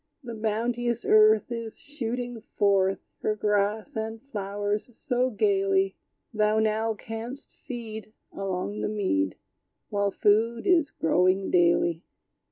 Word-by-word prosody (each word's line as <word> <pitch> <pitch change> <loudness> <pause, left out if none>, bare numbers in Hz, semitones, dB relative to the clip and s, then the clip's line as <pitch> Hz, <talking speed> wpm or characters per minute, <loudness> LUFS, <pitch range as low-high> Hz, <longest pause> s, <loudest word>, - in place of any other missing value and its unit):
The 235 -2 -6
bounteous 235 +2 -1
earth 215 +1 +5
Is 230 -2 -5
shooting 245 -4 -5
forth 195 -1 +2 0.2
Her 215 - 0
grass 210 +5 0
and 220 0 -3
flowers 205 -3 -3
so 250 0 0
gayly; 195 -3 +2 0.4
Thou 215 0 +2
now 220 +1 +1
canst 225 +6 -8
feed 220 -3 -6 0.2
Along 195 +1 -3
the - - -1
mead, 95 - 0 0.5
While 200 -1 +1
food 220 +4 +2
is 345 -6 +4
growing 185 +4 +1
daily. 170 -1 +3
215 Hz, 115 wpm, -27 LUFS, 200-230 Hz, 0.5 s, earth